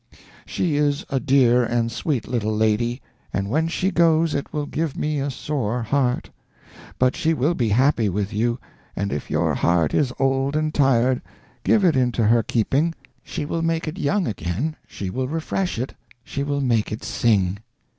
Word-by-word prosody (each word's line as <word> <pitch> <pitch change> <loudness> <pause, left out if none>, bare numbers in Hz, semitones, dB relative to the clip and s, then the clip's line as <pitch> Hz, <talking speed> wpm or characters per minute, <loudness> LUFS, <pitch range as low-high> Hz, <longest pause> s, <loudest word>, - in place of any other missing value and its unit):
She 160 -5 0
is 145 -1 +1
a 135 - +1
dear 125 -3 +4
and 115 0 0
sweet 120 0 -2
little 110 -3 -1
lady, 110 +3 +1 0.3
and 100 +1 -2
when 160 +4 +2
she 185 +3 0
goes 165 -2 +3
it 140 - -3
will 150 -1 -2
give 155 0 -3
me 150 -1 -1
a 140 +1 -1
sore 125 -3 -2
heart. 125 +1 0 0.7
But 130 0 +2
she 160 +1 +1
will 150 +5 +1
be 120 -9 0
happy 120 0 +3
with 100 +1 -2
you, 120 +3 0 0.4
and 100 +1 -2
if 75 - -4
your - - +1
heart 85 -3 +2
is 135 -4 +2
old 135 +1 +1
and 155 0 0
tired, 130 -2 +3 0.4
give 210 -4 +3
it 165 -5 +4
into 125 -3 +2
her 115 +2 +4
keeping; 135 +10 0 0.3
she 145 - -5
will 165 +2 -2
make 165 0 -1
it 160 +5 -5
young 190 +4 +1
again, 105 - -2
she 95 -2 -5
will 130 +3 -2
refresh 165 +4 -2
it, 125 +3 -3 0.3
she 140 - -4
will 140 0 -1
make 115 -5 +1
it 110 - -5
sing. 100 -4 +1
130 Hz, 180 wpm, -23 LUFS, 115-150 Hz, 0.7 s, dear